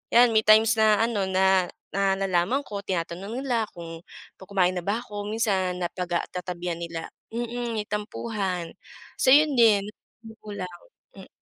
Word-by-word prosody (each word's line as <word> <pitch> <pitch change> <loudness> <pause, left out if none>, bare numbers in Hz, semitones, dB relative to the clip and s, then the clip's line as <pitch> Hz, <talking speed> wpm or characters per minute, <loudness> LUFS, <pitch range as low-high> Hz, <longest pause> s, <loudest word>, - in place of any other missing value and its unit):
'yan 240 0 +7
may 220 -1 +3
times 220 +1 +6
na 215 0 +4
ano 210 -5 0
na 190 -1 +3 0.3
na 195 0 +2
nalaman 190 +6 +1
ko 200 -1 -5
tinatanong 190 +5 -3
nila 245 -5 0
kung 165 -1 -9 0.3
kumain 185 -1 0
na 180 - -3
ba 210 +4 0
ako 205 -4 -7
minsan 190 -5 0
napag 180 0 -4
ah - - -4
tatabihan 180 -1 -4
nila 170 -1 -5 0.2
mm 240 0 -3
may 210 -2 -3
tampuhan 205 -4 -3 0.5
so 260 - +4
'yun 300 0 +5
din. 210 -4 +5 0.4
Magulang, 205 -4 -7 0.5
mm. - - -11
200 Hz, 150 wpm, -26 LUFS, 180-225 Hz, 0.5 s, yan